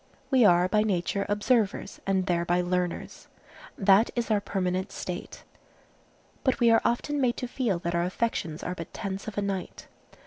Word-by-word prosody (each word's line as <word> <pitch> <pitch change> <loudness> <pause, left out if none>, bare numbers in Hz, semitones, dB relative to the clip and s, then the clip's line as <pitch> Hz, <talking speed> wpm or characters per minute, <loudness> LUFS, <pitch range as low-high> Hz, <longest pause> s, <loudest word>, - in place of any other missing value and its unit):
We 260 -2 +5
are 175 -2 +5
by 210 +3 +2
nature 200 -1 -1
observers, 210 0 0
and 190 -1 +1
thereby 175 -1 +1
learners. 180 -1 -3 0.5
That 200 +3 +5
is 235 -2 -1
our 210 -1 +3
permanent 185 -2 -2
state. 180 0 -6 1.0
But 260 - +1
we 235 -1 +5
are 225 - +5
often 280 +5 0
made 245 -2 +1
to 250 - -3
feel 240 -6 -1
that 170 0 -3
our 170 0 +1
affections 180 -5 -2
are 180 - -3
but 165 -2 -8
tents 195 -1 -5
of 215 - -6
a 205 - 0
night. 195 -2 -4
195 Hz, 170 wpm, -27 LUFS, 180-225 Hz, 1.0 s, We